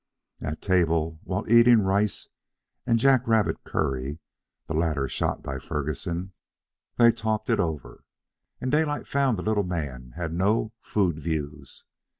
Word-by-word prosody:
At 75 Hz, -, -4 dB
table, 80 Hz, -4 st, +1 dB
while 100 Hz, +3 st, -3 dB
eating 115 Hz, -1 st, +6 dB
rice 100 Hz, +2 st, +1 dB, 0.6 s
and 115 Hz, -, +4 dB
jack 130 Hz, 0 st, +4 dB
rabbit 110 Hz, -2 st, +2 dB
curry 70 Hz, -1 st, -2 dB, 0.5 s
(the -, -, -4 dB
latter 80 Hz, -4 st, 0 dB
shot -, -, -2 dB
by 65 Hz, -, -4 dB
Ferguson), 85 Hz, +7 st, -3 dB, 0.6 s
they 115 Hz, -1 st, +7 dB
talked 110 Hz, 0 st, -2 dB
it 110 Hz, -, +2 dB
over, 75 Hz, -9 st, -3 dB, 0.6 s
and 130 Hz, -, -2 dB
Daylight 150 Hz, 0 st, +1 dB
found 135 Hz, -5 st, +1 dB
the 90 Hz, -, -4 dB
little 110 Hz, -1 st, +2 dB
man 70 Hz, -10 st, -4 dB
had 85 Hz, -2 st, -3 dB
no 105 Hz, +5 st, +1 dB
food 90 Hz, -7 st, 0 dB
"views." 75 Hz, -3 st, -4 dB
90 Hz, 140 wpm, -26 LUFS, 75-110 Hz, 0.6 s, they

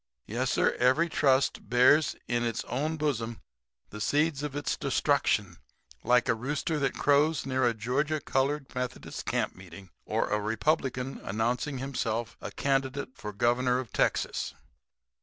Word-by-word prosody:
Yes, 120 Hz, +4 st, -1 dB
sir, -, -, +3 dB
every 130 Hz, +7 st, +3 dB
trust 135 Hz, -3 st, +2 dB
bears 125 Hz, +5 st, +5 dB
in 120 Hz, 0 st, 0 dB
its 115 Hz, -1 st, -1 dB
own 155 Hz, +5 st, -2 dB
bosom 120 Hz, -7 st, -2 dB, 0.5 s
the 105 Hz, -, -7 dB
seeds 145 Hz, +4 st, +1 dB
of 145 Hz, -1 st, -4 dB
its 145 Hz, -, -1 dB
destruction -, -, +1 dB, 0.5 s
like 125 Hz, 0 st, +3 dB
a -, -, +4 dB
rooster 145 Hz, +7 st, -2 dB
that 135 Hz, -, 0 dB
crows 145 Hz, +1 st, +3 dB
near 130 Hz, -2 st, +1 dB
a 115 Hz, -, +1 dB
Georgia 130 Hz, +7 st, 0 dB
colored 135 Hz, +1 st, -1 dB
Methodist 125 Hz, 0 st, -5 dB
camp -, -, 0 dB
meeting, 90 Hz, 0 st, -12 dB, 0.2 s
or -, -, 0 dB
a 105 Hz, 0 st, 0 dB
Republican 130 Hz, +3 st, -1 dB
announcing 120 Hz, +7 st, -1 dB
himself 120 Hz, -4 st, -2 dB
a -, -, -5 dB
candidate 135 Hz, 0 st, -1 dB
for 105 Hz, -, -6 dB
governor 120 Hz, +4 st, +2 dB
of 125 Hz, -5 st, -5 dB
Texas." -, -, 0 dB
130 Hz, 145 wpm, -29 LUFS, 120-145 Hz, 0.5 s, bears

